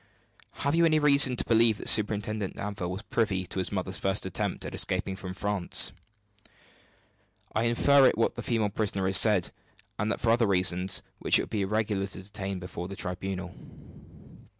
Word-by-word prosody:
"Have 140 - +1
you 170 +1 +3
any 160 -2 +4
reason 140 -3 +5
to - - 0
believe 115 -1 +3
that - - -8
Superintendent 105 -1 +1
Danville 100 -3 -5
was 95 +4 -6
privy 100 -6 -1
to 95 - -5
his 90 -2 -3
mother's 95 -1 -3
first 95 0 -2
attempt 95 - -3
at - - -6
escaping 95 - -1
from 95 -1 -8
France?" 100 -3 +1 1.6
"I 110 - 0
infer 135 +3 +4
it - - +2
from 115 - -2
what - - +1
the - - -6
female 115 -5 0
prisoner 100 -2 -2
has 95 0 +5
said, 105 -6 +3 0.5
and 105 0 -1
for 115 - +1
other 115 -1 +3
reasons 95 0 +1 0.2
which - - +3
it - - 0
would - - -9
be 105 - -1
irregular 105 0 -1
to 95 -1 -8
detail 100 -1 -5
before 90 -1 -7
the 100 - -8
tribunal. 90 -1 -5
100 Hz, 180 wpm, -27 LUFS, 95-110 Hz, 1.6 s, reason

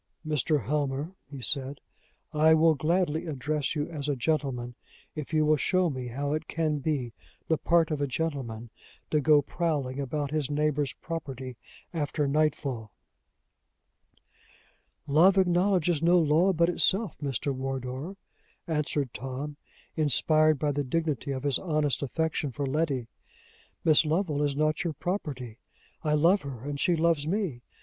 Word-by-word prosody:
"Mr. 150 -2 +1
Helmer," 145 - -1 0.2
he 140 -2 -8
said, 135 +3 -1 0.5
"I 155 +1 +5
will 160 0 +5
gladly 160 +2 0
address 150 0 -2
you 150 -1 -1
as 150 -3 -4
a 145 - +1
gentleman, 130 -3 -1 0.4
if 150 -1 -6
you 155 -1 +3
will 155 0 +4
show 185 +3 +2
me 130 -2 -5
how 140 +4 -2
it 155 +1 -3
can 155 -3 -1
be 135 -5 -2 0.3
the 160 - +1
part 165 -1 +3
of 150 -2 -1
a 145 - +1
gentleman 125 -6 -3 0.4
to 150 - +3
go 150 0 +5
prowling 145 -5 -2
about 140 +1 -2
his 150 -3 -1
neighbor's 150 -2 0
property 135 -6 -6 0.4
after 150 -2 -1
nightfall." 140 -6 0 2.1
"Love 165 +7 +5
acknowledges 180 -3 +2
no 175 +2 +5
law 165 +3 +4
but 170 -1 +3
itself, 190 +3 +2
Mr. 140 0 -1
Wardour," 135 +5 -4 0.5
answered 150 -5 -1
Tom, 135 +3 -5 0.4
inspired 155 +1 +3
by 145 +1 0
the 145 0 -1
dignity 150 -1 -1
of 135 -1 -3
his 140 -3 +1
honest 150 -5 0
affection 150 0 -1
for 140 +3 -3
Letty. 135 -3 0 0.8
"Miss 155 -1 +6
Lovel 155 -1 0
is 145 -1 0
not 155 +2 +1
your 170 -3 -2
property. 135 - -4 0.4
I 150 -2 0
love 170 +6 +4
her, 135 -5 -7
and 145 0 -4
she 175 +2 +3
loves 160 -2 +1
me. 180 - -1
150 Hz, 145 wpm, -28 LUFS, 135-160 Hz, 2.1 s, Miss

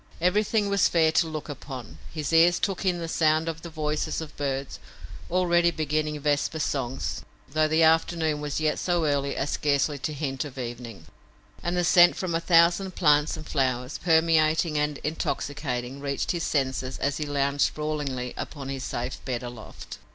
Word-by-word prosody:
Everything 205 +4 +2
was 200 -1 +3
fair 160 -2 +3
to 165 +1 +2
look 155 -2 -5
upon. 130 -5 -8
His 155 -1 -4
ears 170 +2 +6
took 195 0 -2
in 180 -2 +2
the 170 -1 -4
sound 160 0 +2
of 165 -1 -4
the 170 - -8
voices 155 -1 -2
of 160 -2 -8
birds, 135 -1 -3 0.5
already 175 -1 +3
beginning 155 -1 -1
vesper 145 +2 0
songs, 135 -4 -2 0.3
though 155 +2 +2
the 160 +1 +3
afternoon 160 -1 +2
was 145 0 -2
yet 155 -1 0
so 175 -3 +1
early 140 -1 0
as 140 - -2
scarcely 145 0 +1
to 155 - -3
hint 140 -3 -3
of 140 -3 -9
evening, 120 -7 -7 0.6
and 175 +1 -2
the 175 - +2
scent 175 0 +6
from 185 -3 -3
a 165 - +1
thousand 175 +2 +3
plants 150 -1 +3
and 155 - -8
flowers, 130 -1 -1
permeating 160 -1 +3
and 150 -1 0
intoxicating, 140 -4 -3
reached 140 -1 -2
his 175 - -2
senses 130 -2 -1
as 145 0 -1
he 150 - -3
lounged 140 0 0
sprawlingly 145 -5 -1
upon 140 -3 -6
his 135 -1 -4
safe 125 +2 -4
bed 125 -2 -3
aloft. 120 -3 -9
150 Hz, 175 wpm, -26 LUFS, 140-165 Hz, 0.6 s, ears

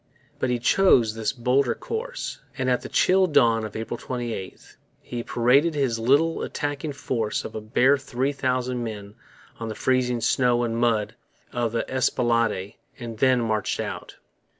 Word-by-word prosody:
But 130 - 0
he 125 - +1
chose 120 - +4
this 110 -1 -1
bolder 125 +1 +1
course; - - -5 0.2
and 130 -1 0
at 125 - +1
the - - -8
chill 190 0 +3
dawn 120 -8 +3
of 110 - -6
April 115 +2 -4
28, 120 -7 -6 0.2
he 120 -1 -6
paraded 135 +8 +2
his 130 -5 0
little 145 +8 +2
attacking 145 0 -3
force 115 -6 -2
of - - -7
a 110 - -5
bare 130 +6 +3
three 135 0 -1
thousand 125 -2 -1
men 105 -3 -7 0.5
on 115 - -4
the 110 - -5
freezing 125 -2 +1
snow 120 +1 +2
and 115 -1 -1
mud 115 -2 +1 0.4
of 120 -2 -1
the 115 - -2
Esplanade 115 -5 0 0.2
and 115 -3 -7
then 130 -1 +4
marched 110 -2 -1
out. - - -5
120 Hz, 160 wpm, -24 LUFS, 115-135 Hz, 0.5 s, chose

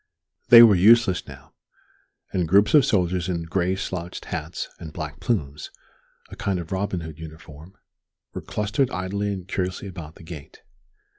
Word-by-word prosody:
They 120 -1 +11
were 110 -3 +7
useless 100 0 +4
now; - - -13 0.8
and 90 -3 0
groups 100 +5 +4
of 150 -3 +7
soldiers 90 -2 0
in 85 -2 -2
gray 90 +2 -1
slouched 90 -2 -6
hats - - -5
and 80 - -8
black 75 -3 -7
plumes 75 - -3 0.6
a - - -8
kind 100 -2 -2
of 85 -2 -7
Robin 95 -2 -2
Hood 80 -1 -9
uniform 80 +2 -12 0.6
were - - -5
clustered 105 +5 -1
idly 100 +2 -3
and 95 -2 -6
curiously 95 0 -3
about 85 -5 -9
the - - -15
gate. 80 -3 -11
90 Hz, 155 wpm, -23 LUFS, 80-100 Hz, 0.8 s, They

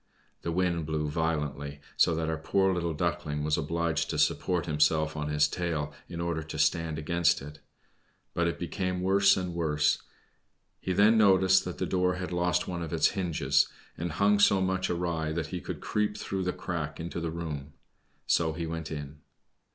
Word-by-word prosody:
The 85 - -3
wind 85 -2 0
blew 75 -1 -1
violently, 75 -3 -2 0.2
so 85 - +4
that 80 0 -1
our 80 -1 -2
poor 95 +4 +2
little 85 -2 -1
Duckling 75 0 -1
was 75 0 +2
obliged 85 +1 -1
to - - -2
support 90 -3 +1
himself 75 0 +2
on 75 -1 -3
his 75 0 +3
tail, 80 -3 -2 0.2
in 85 - -6
order 85 -1 -1
to 80 0 -7
stand 80 +1 +1
against 85 +2 +2
it; 75 +2 -10 0.7
but 85 0 +1
it 85 - -2
became 90 +1 -2
worse 95 +1 +5
and 90 -2 -3
worse. 75 -3 +1 0.8
He 95 - -3
then 105 +4 +5
noticed 95 -2 +5
that 90 - -5
the - - -1
door 90 -1 +1
had 90 0 -5
lost 90 0 +1
one 90 -2 -3
of 80 -2 -5
its 80 -2 +3
hinges, 90 -6 +1 0.3
and 85 -1 -4
hung 100 +3 +3
so 100 -1 +5
much 95 0 0
awry 85 -3 -1
that 80 -2 -2
he 90 - -3
could - - -6
creep 105 0 -1
through 95 -2 -3
the 90 - +1
crack 75 -5 -4
into 85 +1 -4
the 85 - -2
room. 75 -3 -5 0.5
So 80 -2 +2
he 85 +1 -4
went 80 -1 -4
in. 75 -1 -6
85 Hz, 185 wpm, -29 LUFS, 80-90 Hz, 0.8 s, worse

